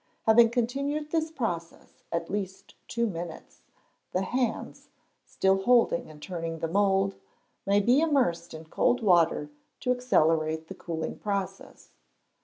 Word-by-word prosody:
Having 230 +1 +6
continued 280 +6 -2
this 320 -1 0
process 175 - -5
at 170 0 -2
least 190 -2 -5
two 235 0 0
minutes, 170 -5 -7 0.5
the 185 - +1
hands 245 +5 -3 0.4
(still 190 0 +2
holding 245 +1 +3
and 155 -1 -13
turning 165 -1 -5
the 165 0 -2
mould) 195 +2 +2 0.5
may 200 +1 +4
be 245 +8 +4
immersed 255 - +1
in 160 0 -9
cold 245 +9 +1
water 165 -6 +3 0.3
to 250 - +1
accelerate 160 -10 +1
the - - -5
cooling 160 -2 -5
process. 200 -2 -5
195 Hz, 130 wpm, -28 LUFS, 165-245 Hz, 0.5 s, Having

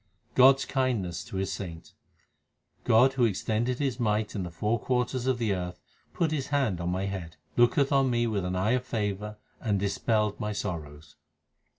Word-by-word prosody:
God 130 +1 +8
s 135 - -4
kindness 110 -11 -1
to - - -9
His 95 0 -1
saint: 85 -2 -7 0.9
God 125 +4 +5
who 130 -3 +3
extended 115 +4 0
His 135 -3 -1
might 105 -2 0
in 100 - -3
the 90 - -4
four 105 +7 -1
quarters 125 +1 -1
of 130 -2 +2
the 115 -4 0
earth 90 -1 -4 0.3
put 165 -3 0
His 145 -4 -2
hand 130 - 0
on 85 - -1
my 95 +2 -1
head, 90 -5 -5 0.2
Looked 120 +3 +4
on 135 -2 +3
me 120 -1 +1
with 105 -4 -1
an 90 0 -2
eye 95 +4 +1
of 125 0 +1
favour, 105 -3 -3 0.2
and 105 -4 0
dispelled 105 +1 0
my 105 0 -2
sorrows. 75 -6 -6
105 Hz, 185 wpm, -28 LUFS, 95-125 Hz, 0.9 s, God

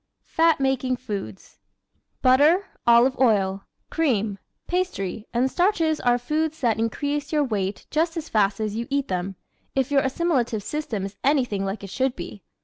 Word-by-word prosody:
Fat 330 -2 +3
Making 265 -1 +1
Foods 210 -6 -7 0.6
¶ - - -54
Butter, 295 +9 +5 0.2
olive 240 +3 +6
oil, 195 -6 +2 0.3
cream, 220 -10 0 0.3
pastry 250 - -2
and 245 +2 +2
starches 340 -4 +2
are 245 0 +3
foods 310 +5 -2
that 230 -4 +1
increase 285 +6 -2
your 300 -2 +2
weight 205 -6 -2
just 325 +2 0
as 325 -1 -4
fast 205 -5 +1
as 215 -1 -2
you 235 +1 -3
eat 280 0 -1
them, 185 +1 -2 0.4
if 270 +1 0
your 280 -1 +4
assimilative 265 - 0
system 230 -8 -3
is 195 +1 -8
anything 255 -8 +1
like 195 +2 -4
it 195 - -8
should 260 +2 0
be. 205 - -8
255 Hz, 160 wpm, -24 LUFS, 210-300 Hz, 0.6 s, olive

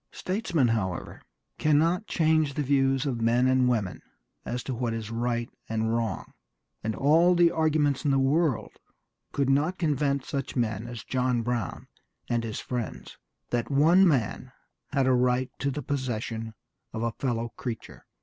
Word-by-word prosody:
Statesmen, 180 - 0
however, 95 -6 -2 0.4
cannot 165 +7 +2
change 155 -3 +2
the 150 - 0
views 135 0 +2
of 125 -5 -2
men 120 +2 +3
and 130 -1 +3
women 105 -7 -1 0.4
as 125 +1 -4
to 130 - -3
what 120 -1 -2
is 110 -1 -5
right 120 0 -1 0.2
and 110 0 0
wrong, 115 -5 -2 0.5
and 110 0 -2
all 165 +6 +4
the 170 -1 +5
arguments 155 -3 +1
in 145 - +1
the 135 - +3
world 135 0 +1 0.6
could 140 -2 0
not 145 +7 +2
convince 140 -4 0
such 135 -2 -3
men 110 -2 -1
as 120 -1 -7
John 125 -2 0
Brown 120 0 -3 0.4
and 120 -1 0
his 110 -2 -4
friends 120 -3 -5 0.3
that 120 -1 -1
one 165 +7 +5
man 125 - 0 0.4
had 140 -2 +2
a 130 - +4
right 125 +1 +2
to 140 - 0
the 145 +1 -4
possession 115 -4 -3 0.4
of 110 - -3
a 115 - 0
fellow 120 -3 -1
creature. 115 -1 -7
130 Hz, 160 wpm, -27 LUFS, 115-145 Hz, 0.6 s, the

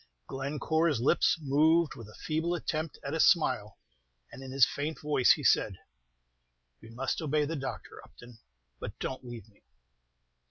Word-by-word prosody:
Glencore's 150 +2 -1
lips 125 - +3
moved 155 +2 +3
with 115 - -11
a 105 - -14
feeble 160 +3 -2
attempt 160 -2 -3
at 140 - -4
a 160 - -1
smile, 155 - +2 0.5
and - - -11
in 130 -1 -8
his 135 -2 +5
faint 150 +3 -4
voice 150 -4 +4
he - - -6
said, - - +2 1.0
"We 110 - -13
must 125 +6 -3
obey 150 -1 +1
the 165 +3 -3
doctor, 135 -3 -7
Upton; 120 -1 -16 0.4
but - - -7
don't 130 - -5
leave 120 -4 -9
me." 105 -2 -26
140 Hz, 155 wpm, -30 LUFS, 125-160 Hz, 1.0 s, his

